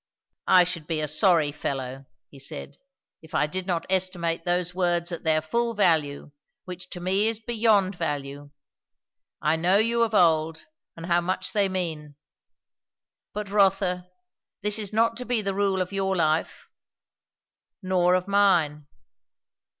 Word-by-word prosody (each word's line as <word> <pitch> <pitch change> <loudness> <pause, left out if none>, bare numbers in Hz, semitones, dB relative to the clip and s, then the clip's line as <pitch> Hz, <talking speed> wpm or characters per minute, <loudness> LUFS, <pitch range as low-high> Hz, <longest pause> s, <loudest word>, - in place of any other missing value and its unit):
"I 180 -1 +7
should 170 -3 -5
be 160 -2 -1
a 155 - -1
sorry 155 -1 +3
fellow," 135 -2 -5 0.2
he 140 - -14
said, 140 +1 -7 0.4
"if 160 -2 -11
I - - +3
did 185 +4 -5
not 175 -3 -1
estimate 180 -3 -1
those 180 0 0
words 175 -1 0
at 170 - -5
their 155 -1 +2
full 235 +8 -1
value, 155 -7 +1 0.3
which 180 0 -9
to 180 - -7
me 190 +4 +1
is 225 -1 -1
beyond 215 -5 +1
value. 145 -3 -4 0.9
I 155 +1 +2
know 180 +4 +3
you 230 +2 +2
of 225 -2 +1
old, 160 -3 +2 0.3
and 165 - -7
how 175 0 +2
much 185 +1 -2
they 200 -3 +2
mean. 160 -6 -4 1.2
But, 210 -1 -6
Rotha, 195 -3 +2 0.6
this 210 +1 +2
is 205 -3 -3
not 230 +1 +1
to 250 - -6
be 235 -3 0
the 195 -1 -1
rule 195 -1 +1
of 180 - -12
your 195 -1 0
life, 160 -2 -1 1.2
nor 180 -1 +2
of 185 +1 -1
mine." 170 -8 +2
180 Hz, 150 wpm, -25 LUFS, 160-195 Hz, 1.2 s, I